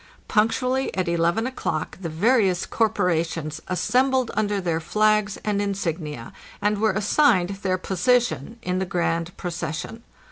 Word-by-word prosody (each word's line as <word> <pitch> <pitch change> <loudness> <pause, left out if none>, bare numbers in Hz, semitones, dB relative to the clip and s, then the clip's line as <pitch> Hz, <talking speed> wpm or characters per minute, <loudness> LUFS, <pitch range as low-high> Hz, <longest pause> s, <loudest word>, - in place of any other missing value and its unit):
Punctually 255 +4 +1
at 185 -1 0
11 170 +6 +1
o'clock 220 -11 -3
the 170 - -3
vari 205 +6 +3
ous 180 -1 -2
corporations 165 -7 0
assembled 255 +6 +1
under 205 -1 0
their 170 -3 -1
flags 215 +3 +2
and 205 -1 +1
insignia, 165 - -3 0.3
and 205 0 +1
were 220 -2 +3
assigned 210 -2 +3
their 185 -2 0
position 235 +5 0
in 180 0 -1
the 190 - -1
grand 170 -1 -1
procession. 175 +5 -5
190 Hz, 135 wpm, -24 LUFS, 170-220 Hz, 0.3 s, vari